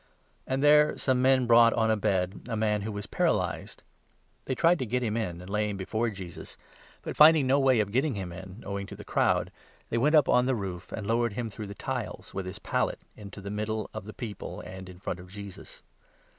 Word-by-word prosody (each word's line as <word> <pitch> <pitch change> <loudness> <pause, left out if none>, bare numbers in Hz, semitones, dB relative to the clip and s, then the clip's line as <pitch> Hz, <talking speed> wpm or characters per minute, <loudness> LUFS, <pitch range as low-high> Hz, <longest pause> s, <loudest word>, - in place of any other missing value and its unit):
And 135 +1 -1
there 150 0 +5
some 130 -2 +1
men 130 -1 +4
brought 115 0 +6
on 110 -1 +2
a - - +3
bed 95 -3 -1
a - - -1
man 105 -1 +1
who 105 - -4
18 - - -5
was 100 - -4
paralyzed. - - -1 0.6
They 130 - -1
tried 165 +6 +4
to 130 - -1
get 125 +3 0
him 110 -2 -1
in 90 -7 -3
and 90 - -10
lay 105 +1 0
him 100 - -4
before 110 +5 -1
Jesus; 95 -5 -9 0.5
but, - - -5
finding 155 -2 +7
no 135 +2 +3
way 130 -3 +4
of 105 -2 0
getting 130 +3 +1
him 95 -3 -5
in, 95 +4 -10
owing 100 -1 -4
to - - -9
the - - -10
19 - - -25
crowd, - - +2 0.4
they 115 - +1
went 150 +6 +3
up 150 -3 +6
on 125 0 +4
the 130 - +2
roof 95 -5 -6
and 110 - -5
lowered 115 +1 +1
him 115 0 -4
through 105 +1 -7
the 100 - -8
tiles, - - -5
with 95 -1 -4
his 95 +2 -6
pallet, - - -1 0.2
into 100 -1 -10
the 100 +1 -6
middle 105 0 -3
of 95 - -6
the 110 - -8
people 110 -6 -6
and 95 0 -9
in 90 - -11
front 90 -1 -4
of 90 0 -12
Jesus. 100 0 -10
110 Hz, 235 wpm, -28 LUFS, 100-125 Hz, 0.6 s, finding